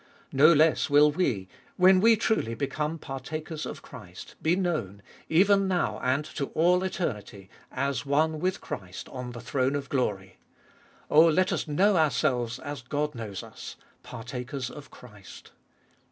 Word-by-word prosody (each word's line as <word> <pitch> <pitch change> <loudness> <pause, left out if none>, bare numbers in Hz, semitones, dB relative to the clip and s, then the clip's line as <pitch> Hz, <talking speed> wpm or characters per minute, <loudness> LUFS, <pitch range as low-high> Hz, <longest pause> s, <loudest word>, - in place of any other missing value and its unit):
No 150 +5 +7
less 155 0 +3
will 145 +1 +6
we, 120 - -1 0.3
when 185 0 +6
we 225 +1 +6
truly 210 - 0
become 150 +4 -2
partakers 155 +3 -6
of - - -8
Christ, 90 0 -11
be 160 +2 +2
known, 135 - -2 0.3
even 195 +4 +4
now 175 - 0
and 135 +4 0
to 140 -2 -4
all 180 +3 +3
eternity, 105 - -4 0.2
as 140 0 -2
one 155 +3 +1
with 185 +4 -1
Christ 95 -2 -7
on 125 -1 -7
the 120 - -8
throne 130 +2 0
of 140 -1 -4
glory. 100 -8 -2 0.7
Oh, 160 +3 +7
let 185 +3 +2
us - - -2
know 190 +6 +3
ourselves 125 -6 +1
as 145 -2 -7
God 150 +4 -2
knows 105 -5 -6
us - - -10
— - - -35
partakers 125 +2 -6
of 145 -2 -11
Christ. 105 -6 -14
145 Hz, 155 wpm, -27 LUFS, 125-165 Hz, 0.7 s, No